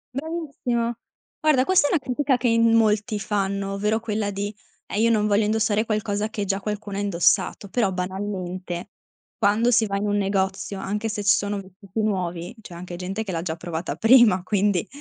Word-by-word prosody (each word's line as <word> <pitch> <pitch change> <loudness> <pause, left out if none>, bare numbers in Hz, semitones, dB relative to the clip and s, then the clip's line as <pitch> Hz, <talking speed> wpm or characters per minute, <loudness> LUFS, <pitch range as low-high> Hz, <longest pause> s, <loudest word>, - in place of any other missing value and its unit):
Bravissimo. 275 -6 -2 0.5
Guarda 300 -5 +4
questa 370 -4 +4
è - - -2
una 330 - +3
critica 265 +1 0
che 245 - 0
in 230 0 +4
molti 215 -1 +2
fanno, 200 -1 -1
ovvero 210 +3 0
quella 215 -2 -2
di: 205 +2 -4 0.3
"Eh, 205 - -2
io 230 - +4
non 210 -2 +2
voglio 205 +1 +3
indossare 215 0 +1
qualcosa 215 -1 -1
che 210 -2 -3
già 195 0 -1
qualcuno 205 -1 -4
indossato". 200 0 +1
Però 205 -1 +1
banalmente, 185 -1 -4 0.5
quando 220 +3 +3
si 225 -2 +4
va 200 0 -1
in 205 +1 -1
un 205 - +1
negozio, 195 -1 -1
anche 210 +3 -2
se 210 -1 -3
ci 200 -1 +5
sono 205 0 -2
vestiti 195 +2 -6
nuovi, 180 -4 -2
c'è 190 - -11
anche 175 +1 -7
gente 190 +5 -4
che 190 - -4
l'ha 165 - -1
già 165 -2 -4
provata 170 0 -4
prima, 225 -5 +6
quindi 200 -1 +1
205 Hz, 185 wpm, -24 LUFS, 195-225 Hz, 0.5 s, prima